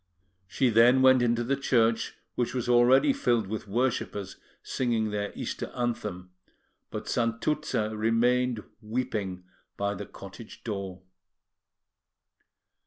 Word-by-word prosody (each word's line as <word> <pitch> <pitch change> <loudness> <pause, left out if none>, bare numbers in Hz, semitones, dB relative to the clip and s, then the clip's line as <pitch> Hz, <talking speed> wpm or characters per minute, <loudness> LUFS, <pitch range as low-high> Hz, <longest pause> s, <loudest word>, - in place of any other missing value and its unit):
She 130 +4 +1
then 120 +4 +6
went 130 -1 +6
into 120 0 +2
the 135 +4 +1
church, 115 -4 +1 0.2
which 120 0 -2
was 125 -2 -2
already 125 - +5
filled 120 - +1
with 105 +2 -5
worshippers 105 -3 -2 0.3
singing 115 -4 -1
their 105 0 -2
Easter - - -4
anthem; 105 -7 -3 0.6
but - - -6
Santuzza 115 -1 -1
remained 115 +1 +2 0.2
weeping 105 -5 -3 0.3
by 100 0 0
the 100 0 -7
cottage 100 +3 -11
door. 95 -4 -5
115 Hz, 110 wpm, -28 LUFS, 105-125 Hz, 0.6 s, then